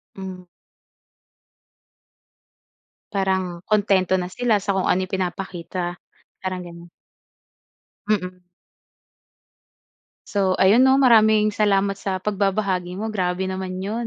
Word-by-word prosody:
Hmm. 190 -1 -8 2.7
Parang, 190 -3 -1
kuntento 195 -3 +2
na 180 - -2
sila 220 +4 0
sa 200 0 -2
kung 190 - 0
ano 185 +1 +2
yung 185 - -19
pinapakita, 180 -1 -4 0.4
parang 185 -1 -4
gano'n. 170 0 -12 1.2
Mm. 180 -3 -1 1.8
So, 190 -2 0
ayun 205 +6 +5
'no, 265 +1 +5
maraming 220 -4 +5
salamat 200 -2 +2
sa 195 -1 -3
pagbabahagi 195 -2 -1
mo. 220 - -3
Grabe 185 -1 -1
naman 185 -1 -4
'yon. 215 +5 -3
190 Hz, 100 wpm, -22 LUFS, 185-205 Hz, 2.7 s, ayun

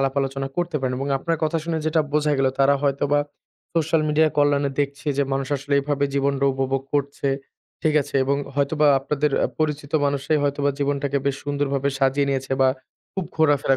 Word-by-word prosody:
আলাপ-আলোচনা 135 0 -1
করতে 175 -2 -1
পারেন 130 -1 -1
এবং 135 +1 -3
আপনার 165 +4 -1
কথা 155 +2 0
শুনে 165 -1 -1
যেটা 160 +1 +2
বোঝা 150 0 +2
গেল 135 - +3
তারা 140 +1 +5
হয়তোবা 140 +1 +2 0.5
সোশ্যাল 160 -1 +2
মিডিয়া 155 +1 +4
কল্যাণে 145 -1 +3
দেখছে 140 +1 -3
যে 140 - +4
মানুষ 135 0 -1
আসলে 140 +1 -2
এভাবে 145 0 0
জীবনটা 140 0 +1
উপভোগ 135 0 -1
করছে। 140 0 -1 0.5
ঠিক 155 -1 +2
আছে? - - -13
এবং 140 +1 +1 0.2
হয়তোবা 145 +2 +2
আপনাদের 150 +2 0 0.2
আ - - -9
পরিচিত 150 -2 -2
মানুষরাই 140 +2 0
হয়তোবা 145 0 +1
জীবনটাকে 140 0 0
বেশ 140 -1 +1
সুন্দরভাবে 140 -1 0
সাজিয়ে 135 +1 +2
নিয়েছে 135 0 -2
বা 130 - +6 0.4
খুব 190 - -3
ঘোরাফেরা 145 -3 +3
140 Hz, 175 wpm, -23 LUFS, 135-150 Hz, 0.5 s, বা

